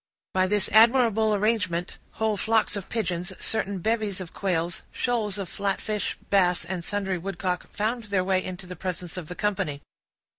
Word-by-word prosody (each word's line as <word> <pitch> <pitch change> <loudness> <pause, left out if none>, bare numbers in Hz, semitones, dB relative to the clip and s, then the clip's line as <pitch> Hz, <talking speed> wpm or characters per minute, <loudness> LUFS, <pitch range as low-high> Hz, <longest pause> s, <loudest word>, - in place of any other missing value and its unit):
By 185 0 +3
this 205 +1 +2
admirable 225 -2 +5
arrangement, 195 -5 0
whole 220 -1 +1
flocks 220 +1 +2
of 200 -2 -5
pigeons, 180 -6 -2
certain 200 -3 -1
bevies 215 0 0
of 180 -3 -7
quails, 175 -3 -1
shoals 220 -5 -1
of 195 -2 -3
flatfish, 200 +2 -2
bass, 180 -4 +3
and 175 0 -3
sundry 195 -1 -1
woodcock, 180 0 -3
found 225 +2 -1
their 200 -3 +1
way 185 0 +2
into 185 0 -6
the 180 0 -7
presence 180 -1 -4
of 180 -4 -5
the 180 - -6
company. 190 -9 -1
195 Hz, 160 wpm, -26 LUFS, 180-215 Hz, -, admirable